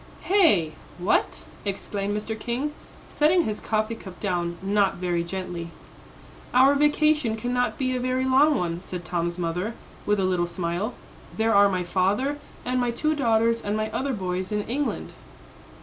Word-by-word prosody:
"Hey 320 Hz, -, +4 dB, 0.3 s
what?" 180 Hz, +3 st, 0 dB, 0.2 s
exclaimed 200 Hz, 0 st, -2 dB
Mr. 215 Hz, +1 st, -3 dB
King, 255 Hz, +7 st, -2 dB, 0.3 s
setting 330 Hz, +4 st, +3 dB
his 215 Hz, -6 st, -3 dB
coffee 215 Hz, +1 st, -1 dB
cup 190 Hz, -5 st, -10 dB
down, 175 Hz, -3 st, -1 dB
not 200 Hz, 0 st, +2 dB
very 175 Hz, -1 st, -1 dB
gently. 175 Hz, -1 st, -5 dB, 0.9 s
"Our 265 Hz, +2 st, +7 dB
vacation 295 Hz, -4 st, +3 dB
cannot 245 Hz, +2 st, -1 dB
be 255 Hz, -1 st, 0 dB
a -, -, -1 dB
very 255 Hz, +1 st, 0 dB
long 275 Hz, +3 st, +4 dB
one," 170 Hz, -1 st, -2 dB
said 180 Hz, -2 st, -7 dB
Tom's 170 Hz, +1 st, -2 dB
mother, 180 Hz, +6 st, -2 dB, 0.3 s
with 210 Hz, -1 st, +2 dB
a 190 Hz, -, +2 dB
little 180 Hz, -2 st, +1 dB
smile; 175 Hz, +6 st, -3 dB, 0.4 s
"there 225 Hz, +1 st, +2 dB
are 200 Hz, 0 st, +6 dB
my 185 Hz, -2 st, -1 dB
father 200 Hz, +11 st, 0 dB, 0.3 s
and 250 Hz, 0 st, 0 dB
my 245 Hz, -, +1 dB
two 305 Hz, +6 st, 0 dB
daughters 230 Hz, -3 st, +2 dB
and 205 Hz, +1 st, -1 dB
my 215 Hz, 0 st, -2 dB
other 265 Hz, +5 st, -1 dB
boys 185 Hz, -2 st, -3 dB
in 210 Hz, 0 st, 0 dB
England." 275 Hz, +6 st, -2 dB
215 Hz, 160 wpm, -25 LUFS, 180-255 Hz, 0.9 s, Our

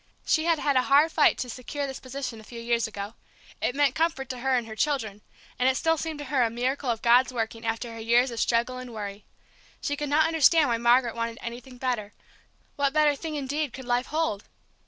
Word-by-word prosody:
She 315 Hz, 0 st, +2 dB
had 335 Hz, -1 st, +3 dB
had 285 Hz, -2 st, 0 dB
a 255 Hz, -, +5 dB
hard 285 Hz, +5 st, +4 dB
fight 305 Hz, -, +4 dB
to 255 Hz, -, -3 dB
secure 255 Hz, +4 st, -5 dB
this 270 Hz, -1 st, -6 dB
position 255 Hz, -3 st, -6 dB
a -, -, -13 dB
few 235 Hz, +2 st, -9 dB
years 235 Hz, 0 st, 0 dB
ago; 205 Hz, 0 st, -6 dB, 0.5 s
it 250 Hz, -, 0 dB
meant 285 Hz, -1 st, +3 dB
comfort 315 Hz, -5 st, -1 dB
to 255 Hz, -, -5 dB
her 265 Hz, +1 st, +1 dB
and 240 Hz, -2 st, 0 dB
her 220 Hz, -1 st, -8 dB
children, 220 Hz, -7 st, -1 dB, 0.4 s
and 255 Hz, +1 st, +4 dB
it 260 Hz, -, +1 dB
still 325 Hz, +2 st, +2 dB
seemed 320 Hz, 0 st, -4 dB
to 290 Hz, -, -6 dB
her 275 Hz, -3 st, +1 dB
a 235 Hz, -, +3 dB
miracle 255 Hz, +3 st, -2 dB
of 230 Hz, -2 st, -1 dB
God's 245 Hz, +2 st, +5 dB
working, 225 Hz, -1 st, -3 dB
after 230 Hz, +1 st, -3 dB
her 230 Hz, -, -8 dB
years 240 Hz, +3 st, +3 dB
of 230 Hz, -, -5 dB
struggle 240 Hz, +2 st, +1 dB
and 250 Hz, -2 st, -9 dB
worry. 205 Hz, -1 st, -6 dB, 0.5 s
She 290 Hz, -, -2 dB
could 295 Hz, 0 st, -4 dB
not 305 Hz, +2 st, +4 dB
understand 320 Hz, -2 st, +4 dB
why 235 Hz, -, +1 dB
Margaret 240 Hz, 0 st, +4 dB
wanted 230 Hz, 0 st, -3 dB
anything 245 Hz, +2 st, -8 dB
better; 240 Hz, -5 st, -2 dB, 0.6 s
what 280 Hz, -1 st, +1 dB
better 300 Hz, -1 st, +4 dB
thing 315 Hz, +1 st, -5 dB
indeed 285 Hz, -1 st, -2 dB
could 260 Hz, -, -8 dB
life 245 Hz, +1 st, 0 dB
hold! 305 Hz, -10 st, -1 dB
255 Hz, 225 wpm, -26 LUFS, 235-290 Hz, 0.6 s, a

